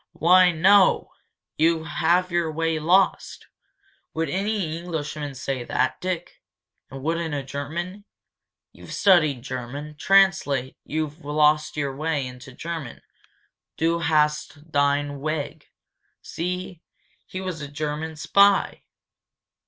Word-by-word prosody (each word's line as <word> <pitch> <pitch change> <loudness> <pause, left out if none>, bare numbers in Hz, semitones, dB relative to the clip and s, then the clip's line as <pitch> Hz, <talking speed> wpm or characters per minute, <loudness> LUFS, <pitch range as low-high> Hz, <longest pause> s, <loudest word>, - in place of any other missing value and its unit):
"Why, 180 +2 +5
no 190 +4 +4 0.2
" - - -63
"You 165 0 +3
have 175 +3 +1
your 170 -2 0
way 165 0 -1
lost!' 180 +5 +1 0.7
Would 165 +1 -1
any 195 -4 -1
Englishman 150 -4 -5
say 130 -1 -3
that, - - -1
Dick? 175 -2 -4 0.5
And 135 0 -9
wouldn't 165 0 -1
a 140 - -3
German? 170 +9 -5 0.7
You've - - -11
studied 155 - +4
German. 130 +4 -6
Translate 190 -10 +3
'You've 155 +1 -4
lost 150 +1 +2
your 140 -2 -2
way' 150 -1 -1
into 125 +1 -10
German. 160 -2 -7 0.7
'Du 165 +1 +1
hast 150 0 0
dein 145 0 +1
weg 155 0 -4 0.3
' - - -47
See? 180 0 -5 0.5
He 185 - -6
was 185 -4 -5
a 145 - -5
German 150 +2 -4
spy!" 200 +6 +3
160 Hz, 120 wpm, -24 LUFS, 145-175 Hz, 0.7 s, Why